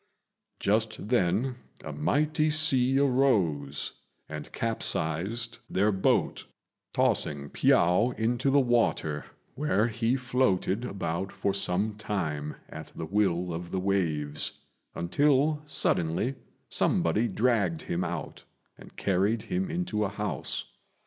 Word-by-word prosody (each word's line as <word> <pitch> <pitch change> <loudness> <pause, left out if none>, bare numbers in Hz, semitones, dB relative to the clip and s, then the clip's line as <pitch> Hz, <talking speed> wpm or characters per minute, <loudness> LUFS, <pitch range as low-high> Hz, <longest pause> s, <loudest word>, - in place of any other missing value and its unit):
Just 110 0 0
then 120 +3 +1 0.3
a - - -5
mighty 155 +1 +1
sea 135 -4 +4
arose 100 - +1 0.3
and - - -7
capsized 110 +1 -1
their 105 +3 +2
boat, 95 -1 +1 0.5
tossing 70 -1 +1
Piao 90 +8 +3
into 120 +4 +1
the 140 +1 +5
water, 115 - +1 0.3
where 130 -6 +1
he 115 +2 0
floated 125 -5 0
about 95 -3 -3
for 100 0 -1
some 100 +2 +1
time 80 -9 -3
at - - -9
the 80 - -4
will 90 -2 0
of 85 +1 -5
the 95 - -2
waves, 80 -7 0 0.4
until 145 - +2
suddenly 90 - +1 0.3
somebody 105 +8 +2
dragged 105 -6 +1
him 85 +1 -2
out - - -5 0.4
and - - -14
carried 100 +4 +1
him 185 0 -2
into 170 -12 -1
a 100 - 0
house. 105 +1 -4
105 Hz, 115 wpm, -28 LUFS, 90-125 Hz, 0.5 s, the